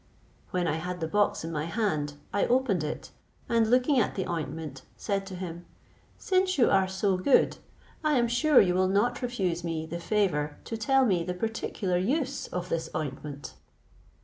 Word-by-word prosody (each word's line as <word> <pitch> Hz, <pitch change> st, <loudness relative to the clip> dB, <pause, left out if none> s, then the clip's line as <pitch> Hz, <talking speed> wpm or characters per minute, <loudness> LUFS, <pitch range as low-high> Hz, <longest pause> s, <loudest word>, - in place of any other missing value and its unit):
When 180 Hz, -1 st, 0 dB
I 155 Hz, 0 st, 0 dB
had 180 Hz, +2 st, -4 dB
the 160 Hz, -, -2 dB
box 205 Hz, +2 st, +1 dB
in 165 Hz, -, -4 dB
my 150 Hz, -1 st, -2 dB
hand, 165 Hz, -7 st, -1 dB, 0.2 s
I 200 Hz, -, +2 dB
opened 240 Hz, -9 st, +2 dB
it, 150 Hz, -, -5 dB, 0.4 s
and 230 Hz, -3 st, +2 dB
looking 255 Hz, +3 st, +4 dB
at 220 Hz, -, 0 dB
the 190 Hz, -, -1 dB
ointment, 160 Hz, -5 st, -4 dB, 0.2 s
said 195 Hz, -1 st, -2 dB
to 190 Hz, -, -7 dB
him, 175 Hz, -1 st, -7 dB, 0.5 s
"Since 370 Hz, -1 st, +1 dB
you 245 Hz, -, +4 dB
are 190 Hz, -1 st, +4 dB
so 190 Hz, 0 st, 0 dB
good, 185 Hz, +9 st, +3 dB, 0.5 s
I 305 Hz, -1 st, +2 dB
am 240 Hz, -1 st, +3 dB
sure 265 Hz, +5 st, +4 dB
you 180 Hz, -2 st, +4 dB
will 185 Hz, +1 st, +3 dB
not 215 Hz, +6 st, +1 dB
refuse 190 Hz, -9 st, -1 dB
me 165 Hz, -2 st, -2 dB
the 170 Hz, +2 st, -5 dB
favour 170 Hz, -7 st, 0 dB
to 225 Hz, -, -5 dB
tell 265 Hz, +5 st, +3 dB
me 185 Hz, -7 st, +2 dB
the 180 Hz, +1 st, -3 dB
particular 200 Hz, -2 st, -2 dB
use 270 Hz, -, -1 dB
of 180 Hz, 0 st, -4 dB
this 165 Hz, -1 st, -2 dB
ointment." 145 Hz, -1 st, -5 dB
190 Hz, 180 wpm, -28 LUFS, 165-235 Hz, 0.5 s, looking